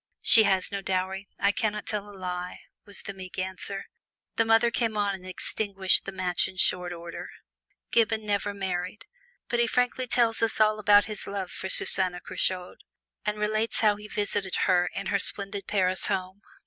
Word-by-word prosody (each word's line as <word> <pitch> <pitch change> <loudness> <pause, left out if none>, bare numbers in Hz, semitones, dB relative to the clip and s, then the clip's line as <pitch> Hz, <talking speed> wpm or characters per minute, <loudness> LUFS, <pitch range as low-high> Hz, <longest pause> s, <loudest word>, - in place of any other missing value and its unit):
"She 225 - +8
has 190 -1 +1
no 200 0 -3
dowry! 190 +1 -2
I 200 - +3
can 210 0 -1
not 210 -1 -6
tell 205 -1 -3
a 200 - -12
lie," 180 -1 -5 0.2
was 205 -2 -6
the 200 - -6
meek 185 -1 -10
answer. 190 +1 -4 0.5
The 225 - +2
mother 225 +1 +4
came 225 -2 -1
on 205 -1 +1
and 185 -1 -9
extinguished 195 +1 0
the 195 - -4
match 185 -2 +1
in 185 - -11
short 180 -1 +2
order. 170 -1 -7 0.6
Gibbon 220 -1 +2
never 205 0 0
married. 190 +1 -4 0.4
But 240 - -1
he 235 - +3
frankly 250 +1 0
tells 230 -2 +2
us 225 -1 0
all 215 0 +4
about 205 0 +6
his 210 0 -6
love 195 -2 -4
for 190 - -6
Susanna 185 -2 +3
Curchod, 185 0 -2 0.5
and 210 0 0
relates 215 +2 0
how 210 -2 +4
he 210 +1 -10
visited 205 -2 -1
her, 180 -2 +3
in - - -4
her 200 - +3
splendid 200 +1 -1
Paris 185 -2 +1
home. 190 +1 -3
200 Hz, 185 wpm, -27 LUFS, 185-215 Hz, 0.6 s, She